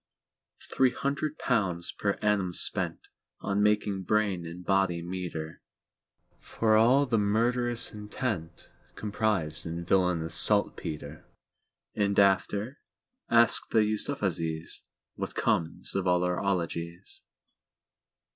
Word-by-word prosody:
Three 130 -1 +4
hundred 140 +2 -2
pounds 95 -8 -1
per 100 -1 -1
annum 100 -4 +1
spentOn - - +1 0.6
making 105 -1 +1
brain 95 -3 0
and 90 +2 -9
body 95 -3 +1
meeterFor 85 -3 -5 1.2
all 130 +5 +4
the 115 -4 +1
murderous 120 +3 +1
intentComprised 105 -3 -4
in 85 +1 -5
"villainous 90 -3 +1
saltpetre!"And 80 +6 -1
after?—Ask 115 - +1
the 110 - +3
YusufzaiesWhat 95 - -3
comes 80 - 0
of 95 -1 -1
all 90 0 +3
our 90 -1 0
'ologies. 85 -2 -3
100 Hz, 85 wpm, -28 LUFS, 85-110 Hz, 1.2 s, Three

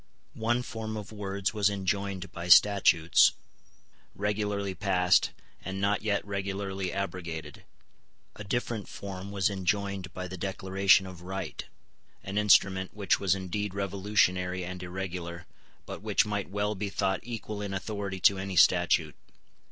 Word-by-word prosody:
One 120 +2 +1
form 110 -2 -5
of 105 -1 -7
words 100 -2 -3
was 105 -2 +3
enjoined 100 -1 -2
by 85 +1 -6
statutes, 90 -3 +6 0.8
regularly 105 -1 -1
passed, 90 -2 +3 0.3
and 95 0 -4
not 100 +1 +1
yet 105 -2 0
regularly 100 -1 -3
abrogated. 90 -5 -5 0.7
A 105 - -8
different 110 0 -2
form 100 -1 -7
was 100 -2 +1
enjoined 100 -1 -2
by 90 0 -5
the 95 +1 -7
Declaration 95 0 +3
of 90 -2 -10
Right, 95 +2 -5 0.6
an 100 +2 -2
instrument 95 -2 +3
which 100 -4 +1
was 95 -2 +2
indeed 95 +1 -3
revolutionary 95 -2 0
and 90 0 -6
irregular, 90 -1 -5 0.4
but - - -7
which - - +2
might 105 -3 -3
well 105 +2 -1
be 100 0 -3
thought 95 -1 0
equal 110 -3 -6
in 100 -1 -4
authority 100 -1 -4
to 100 +2 +5
any 95 0 -4
statute. 85 -3 +4
95 Hz, 135 wpm, -29 LUFS, 95-100 Hz, 0.8 s, statutes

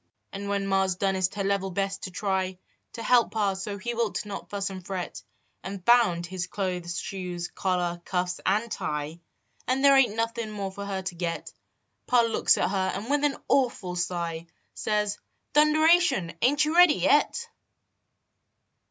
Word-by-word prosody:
And 200 +1 -5
when 200 -1 0
ma 195 0 +2
s 190 -1 -1
donest 190 0 0
her 200 - -2
level 195 -1 0
best 195 +1 -2
to - - -5
try 190 0 -2 0.4
To 230 - -6
help 245 -1 +4
pa 205 -3 0
so 195 +1 -5
he 240 +5 -4
wilt 230 -2 -1
not 200 -1 -7
fuss 200 0 -3
and 185 -1 -8
fret, 185 -1 -5 0.4
And 190 0 -7
found 225 -8 +4
his 180 0 -4
clothes, 180 -3 -3
shoes, 180 -3 -5
collar, 175 -2 -1
cuffs 180 0 -2
and 215 +4 +1
tie, 150 -2 -3 0.5
And 265 +2 +1
there 275 0 +7
ain 270 -2 +5
t 210 - -8
nothin 230 0 -2
more 200 -2 -4
for 200 +1 -7
her 190 -1 -3
to 185 - -4
get, 170 -1 -4 0.5
Pa 245 -1 +5
looks 230 -1 +3
at - - 0
her 190 -1 0
and 210 +7 -4
with 290 0 +2
an 290 -2 +1
awful 235 -9 +1
sigh 170 -2 -3 0.3
Says: 210 -1 -1 0.2
" - - -50
Thunderation! 305 - +4
Ain 255 +5 +4
t 300 +1 +2
you 320 - -2
ready 355 -4 +7
yet?" 470 - +2
195 Hz, 180 wpm, -27 LUFS, 185-230 Hz, 0.5 s, there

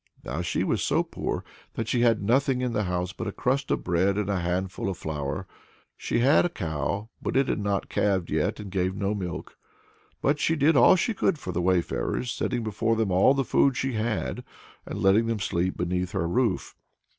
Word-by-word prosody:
Now 75 +7 -3
she 85 - -1
was - - 0
so - - +2
poor - - -4 0.3
that 115 - -3
she 120 +1 +1
had 115 -3 +3
nothing 130 +4 +2
in 125 -2 -1
the 105 -1 0
house 90 0 -2
but - - -5
a - - -2
crust 135 +6 -1
of - - 0
bread 95 +3 +1
and 105 -1 0
a 95 - 0
handful 90 +2 -2
of 95 - -4
flour. 75 -3 -4 0.5
She - - -2
had 140 +5 +5
a 175 - +1
cow, 100 - -3
but - - -1
it 135 - +3
had - - 0
not 100 -1 -1
calved 95 -4 0
yet, 75 +5 0
and 100 -3 -7
gave 95 0 0
no 100 +1 -1
milk. 90 -4 -6 0.6
But 145 +2 +1
she 165 - +2
did 150 +2 +3
all 130 +8 +7
she 190 +5 0
could 195 -4 +1
for 95 - -6
the 90 0 -1
wayfarers, 95 +6 0
setting 120 +1 -2
before 110 +1 0
them 110 -3 0
all 95 +9 +5
the 135 -1 0
food 130 +2 +3
she 135 -1 -1
had, 110 -6 -2 0.4
and - - -5
letting 105 +3 +3
them 115 -1 0
sleep 95 -1 -1
beneath 90 +1 -2
her 85 - 0
roof. 115 +2 0
100 Hz, 210 wpm, -26 LUFS, 90-120 Hz, 0.6 s, all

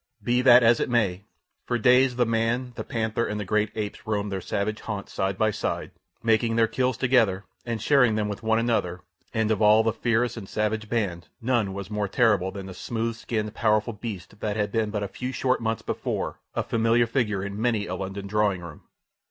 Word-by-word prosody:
Be 125 +1 +2
that 125 -1 +7
as 115 +1 +5
it - - -1
may, 100 -5 +1 0.4
for 120 - +1
days 125 +2 +4
the 120 0 +2
man, 115 +2 0
the - - -4
panther, 110 0 -1
and 105 0 -3
the 105 - -3
great 105 +2 +1
apes 105 -1 -5
roamed 105 -1 -1
their 95 -1 -3
savage 105 +4 -2
haunts 105 -3 -5
side 95 -1 -1
by 110 0 +2
side, - - -3 0.3
making 115 0 +2
their 115 0 +4
kills 125 +1 0
together 115 -7 +2 0.2
and 115 -1 -2
sharing 125 -1 +4
them 105 -1 0
with 105 +1 -5
one 110 0 +2
another, 115 -6 0 0.3
and 110 -1 0
of 110 - 0
all 110 +1 +6
the 110 -1 +1
fierce 120 0 0
and 100 -4 -8
savage 110 0 -1
band 100 -7 -2
none 115 -5 +1
was 100 0 -6
more 105 -1 -1
terrible 100 -4 +2
than 100 0 -7
the 95 - -8
smooth 115 +3 -3
skinned, 110 -2 -3
powerful 110 +1 +1
beast 105 -2 -7
that 105 0 -2
had 105 -1 0
been 110 -1 0
but 105 -1 -2
a - - -2
few 125 +6 -5
short 130 0 0
months 115 0 -2
before - - -3 0.2
a - - 0
familiar 115 +1 +2
figure 110 -5 -1
in 100 +1 -5
many 115 -4 +1
a 90 - -5
London 95 +1 -5
drawing 100 -2 +1
room. 85 -4 -10
110 Hz, 210 wpm, -25 LUFS, 100-115 Hz, 0.4 s, that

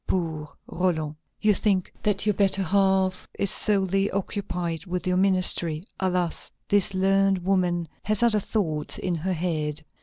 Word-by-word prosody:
Poor 160 -4 -2 0.2
Roland! 160 -4 -1 0.3
You 215 -1 +4
think 195 -2 0
that 205 -1 0
your 210 - +3
better 195 -1 +2
half 190 0 +1
is 200 - +2
solely 195 -1 +2
occupied 180 -3 -3
with 180 +1 -3
your 180 0 +1
ministry. 185 -4 +1 0.2
Alas! 180 -3 0 0.2
this 200 -1 +2
learned 195 +1 +3
woman 180 -3 +1
has 215 +2 +1
other 225 -3 +4
thoughts 160 -8 -2
in 180 - -2
her 175 +3 -1
head. 155 -3 -2
185 Hz, 145 wpm, -25 LUFS, 170-195 Hz, 0.3 s, You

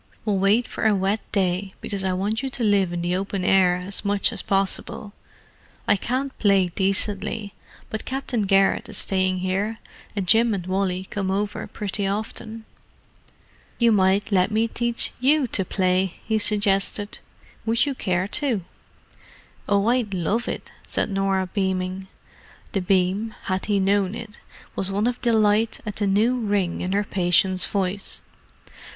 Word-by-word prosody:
We'll 205 -3 +1
wait 205 +5 +3
for - - -1
a 215 - +4
wet 195 +3 +1
day, 190 0 0
because 200 -2 -4
I 190 - 0
want 205 +5 -1
you 270 - -3
to 255 -2 -3
live 200 -4 +3
in 175 0 -3
the 175 +1 0
open 195 0 -2
air 185 -2 +4
as 180 +3 -1
much 200 -1 +1
as - - 0
possible. 195 +1 -2 0.7
I - - +5
can't 260 +6 -2
play 195 -3 +3
decently, 200 +2 -1 0.4
but 220 - -4
Captain 260 -3 -2
Garrett 195 0 +3
is - - -3
staying 185 -1 +1
here, 195 +4 -1 0.4
and 195 -3 -2
Jim 225 +2 +4
and 180 -3 -5
Wally 185 0 -1
come 195 -2 -2
over 205 +2 -2
pretty 200 -1 -2
often." 220 +2 -4 1.1
"You 235 -1 +4
might 200 +1 +2
let 185 -2 +3
me 220 +1 +1
teach 235 0 0
you 280 +3 +3
to 195 - 0
play," 185 0 0
he 220 -1 +1
suggested. 205 0 +1 0.5
"Would 230 +3 +3
you 285 - -1
care 185 -6 -1
to?" 225 - 0 1.0
"Oh, 200 0 +3
I'd 235 -4 +1
love 200 +7 -1
it," - - -5 0.2
said - - +1
Norah, 195 -1 +1
beaming. 190 -1 -2 0.6
The 195 - -1
beam, 190 +4 +1
had 185 0 -2
he 205 -2 +2
known 195 +1 +1
it, 230 -2 -9 0.4
was 195 - -2
one 200 +2 0
of 245 0 -1
delight 220 -1 +2
at 210 -2 -5
the 205 - 0
new 220 +6 +2
ring 200 -6 0
in 180 - -2
her 205 +1 +2
patient's 185 -1 +2
voice. 195 0 -1
200 Hz, 160 wpm, -23 LUFS, 190-220 Hz, 1.1 s, I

